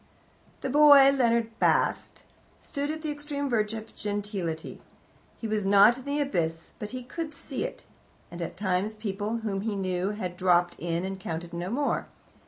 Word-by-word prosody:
The 270 - -2
boy, 285 -1 +8
Leonard 235 -4 +1
Bast, - - +1 0.4
stood 285 -1 -4
at 315 +1 -4
the 305 - -1
extreme 290 -1 -3
verge 220 -3 0
of 220 0 -8
gentility. 205 -6 -4 0.6
He 225 - -4
was 215 -1 0
not 200 +4 +6
in 260 - -12
the 285 +1 -1
abyss, 165 - -1
but 210 - -5
he 255 +1 -6
could 305 +4 -6
see - - -4
it, - - -7 0.5
and 175 0 -7
at 170 - -5
times 195 +2 0
people 210 +1 -3
whom 195 -2 -1
he 215 0 -2
knew 185 -1 -1
had 185 -4 -4
dropped 175 -1 +3
in, 170 +1 -2
and 190 0 -5
counted 170 -1 -5
no 175 +2 -3
more. 280 +6 0
210 Hz, 175 wpm, -28 LUFS, 185-265 Hz, 0.6 s, boy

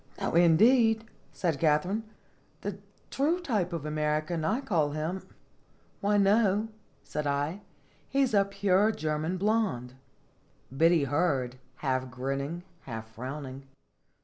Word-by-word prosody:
"No, - - -2
indeed," 220 +7 +5 0.3
said 165 -6 -1
Katharine; 165 +7 +2 0.6
"the 200 -1 -4 0.3
true 310 +6 +1
type 215 - -1
of 165 -3 -4
an - - -2
American 155 +2 0
I 215 +10 +1
call 160 - 0
him." 160 +5 -2 0.8
"Why 205 +1 +2
no," 205 +1 +3 0.3
said 150 -1 -3
I; 145 +7 -1 0.5
"he 275 0 +3
is 255 - 0
a 200 -1 +5
pure 200 +1 +2
German 155 0 -2
blonde." 195 - 0 0.8
Biddy 165 +1 +4
heard, 140 -4 0 0.3
half 130 -1 0
grinning, 135 +6 -3 0.2
half 110 -3 -7
frowning. 135 +2 -7
165 Hz, 120 wpm, -29 LUFS, 145-205 Hz, 0.8 s, indeed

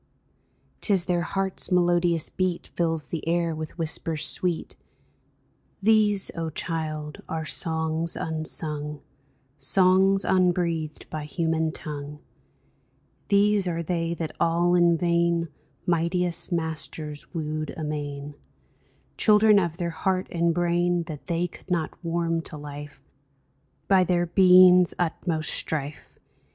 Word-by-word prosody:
'Tis 195 -4 +2
their 175 -1 +1
heart's 190 +2 -2
melodious 175 -2 +2
beat 185 -2 -2
Fills 165 -3 -2
the 165 -1 -5
air 170 0 +1
with 155 +1 -7
whispers 160 -1 -2
sweet! 175 0 -2 1.0
These, 210 -1 +3
O 165 -1 -3
child, 155 -2 -4
are 160 -1 -3
songs 160 +1 -1
unsung 150 -2 -3 0.3
— 135 +1 -40
Songs 190 +1 +3
unbreathed 175 -4 0
by 155 -1 -4
human 160 0 -1
tongue; 150 -1 -7 1.1
These 200 -1 +3
are 170 -1 -2
they 170 0 -1
that 160 -2 -5
all 170 +1 +2
in 175 -1 +4
vain 170 0 +1 0.4
Mightiest 175 +1 0
masters 160 -2 -3
wooed 155 -2 -3
amain 145 -2 -4 0.4
— - - -38
Children 210 -1 +6
of 170 -3 -2
their 170 -2 -2
heart 185 +3 -1
and 170 0 +1
brain 175 0 +1
That 155 -4 -9
they 170 0 0
could 175 - -16
not 170 -3 -1
warm 165 0 -1
to 150 - -8
life 145 -1 -9 0.8
By 190 -2 +5
their 175 -1 +1
being's 180 0 +6
utmost 165 -2 0
strife. 150 -1 -4
170 Hz, 120 wpm, -25 LUFS, 155-180 Hz, 1.1 s, Children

